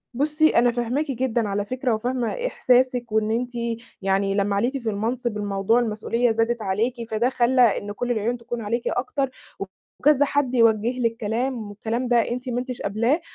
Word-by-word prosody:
بُصّي 305 +3 +3
أنا 240 +1 +5
فاهماكِ 250 +5 -1
جدًا 240 -3 0
على 200 +1 -1
فكرة، 255 +1 -1
وفاهمة 245 +2 -2 0.2
إحساسِك، 250 - +2
وإن 220 0 +1
أنتِ 245 +2 -1 0.5
يعني 195 0 +1
لمّا 200 0 +1
عِليتِ 245 +7 0
في 235 -4 -3
المنصب 230 +2 -1
الموضوع 205 +2 +1
المسؤولية 230 +1 0
زادِت 225 +1 0
عليكِ، 215 +5 0 0.2
فده 225 +3 +2
خلّى 255 0 +2 0.2
إن 205 - -5
كلّ 245 +4 -3
العيون 235 +2 0
تكون 235 0 -6
عليكِ 230 +3 -2
أكتر، 270 +2 -1 0.7
وكذا 290 0 +4
حد 275 -3 0
يوجّه 230 +1 +3
لِك 230 -2 0
كلام 230 +1 -2
والكلام 225 +4 -3
ده 235 -1 +2
أنتِ 250 +2 -4
ما 245 0 -1
أنتِش 250 0 -5
قابلاه، 230 - +1
235 Hz, 170 wpm, -23 LUFS, 220-250 Hz, 0.7 s, أنا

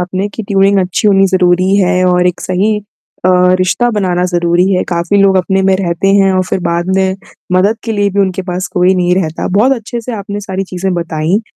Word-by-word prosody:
आपने 185 +3 -3
कि 215 +2 -7
ट्यूनिंग 195 0 +2
अच्छी 185 +3 -1
होनी 195 -1 +4
ज़रूरी 185 0 +2
है 185 -2 +2
और 180 0 +2
एक 180 - -2
सही 200 +4 0 0.5
अ, - - +3 0.3
रिश्ता 185 +6 +1
बनाना 185 -4 -1
ज़रूरी 175 0 +1
है। 180 - +1
काफ़ी 175 +3 -1
लोग 195 -1 +3
अपने 190 +1 0
में 190 0 +2
रहते 180 0 -1
हैं 195 -1 +3
और 185 0 +1
फिर - - -1
बाद 170 +1 -2
में 190 0 0 0.4
मदद 195 +5 +2
के 225 - -2
लिए 205 -1 0
भी 200 +1 0
उनके 190 -1 -1
पास 185 0 -4
कोई 180 +1 +2
नहीं 180 -1 +1
रहता, 165 -4 -2
बहुत 215 +8 +2
अच्छे 235 -1 -4
से 245 +2 -7
आपने 205 0 -6
सारी 195 -1 -4
चीज़ें 185 0 -3
बताईं। 170 +3 -1
190 Hz, 215 wpm, -12 LUFS, 180-200 Hz, 0.5 s, होनी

